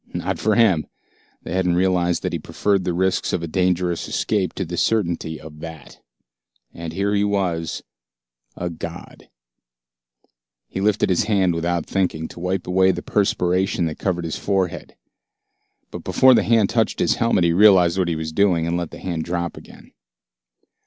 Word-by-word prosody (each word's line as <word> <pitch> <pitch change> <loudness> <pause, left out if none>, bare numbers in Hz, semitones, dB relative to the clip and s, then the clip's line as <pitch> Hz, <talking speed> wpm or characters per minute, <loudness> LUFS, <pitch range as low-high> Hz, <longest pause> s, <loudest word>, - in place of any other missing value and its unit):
Not - - -2
for 110 0 +1
him. 95 -10 +3 0.6
They - - -6
hadn't 90 -2 +1
realized 90 -1 +1
that - - -2
he - - -2
preferred 100 -3 -1
the 90 - 0
risks 95 +1 0
of - - -1
a - - -3
dangerous 90 0 0
escape 100 -4 -1
to 95 - -3
the 85 +1 -5
certainty 85 -6 0
of 75 +2 -12
that. 80 -2 -10 0.7
And 85 -1 -6
here 100 +4 -1
he 100 0 +2
was 90 -6 -1 0.7
a 90 0 -4
god. 80 - -9 1.4
He 95 - -5
lifted 105 0 +2
his 90 +3 +2
hand 95 -5 +2
without 85 0 -1
thinking, 90 -5 -1
to - - -11
wipe 90 +2 -2
away 95 +1 +3
the 95 - -1
perspiration 95 -2 +1
that 80 - -4
covered 85 -3 -1
his 80 - -3
forehead. 95 -4 -2 1.0
But - - -7
before 130 0 +5
the - - +4
hand 115 -3 +2
touched 115 -2 +1
his - - +1
helmet 115 -6 +2
he 85 -1 +3
realized 95 -2 +5
what 90 - +1
he 85 - -1
was 80 0 -4
doing, 90 -2 +2
and 85 +1 -1
let 85 -2 -3
the - - -10
hand 85 -3 -3
drop 85 0 -3
again. - - -14
90 Hz, 175 wpm, -21 LUFS, 85-95 Hz, 1.4 s, before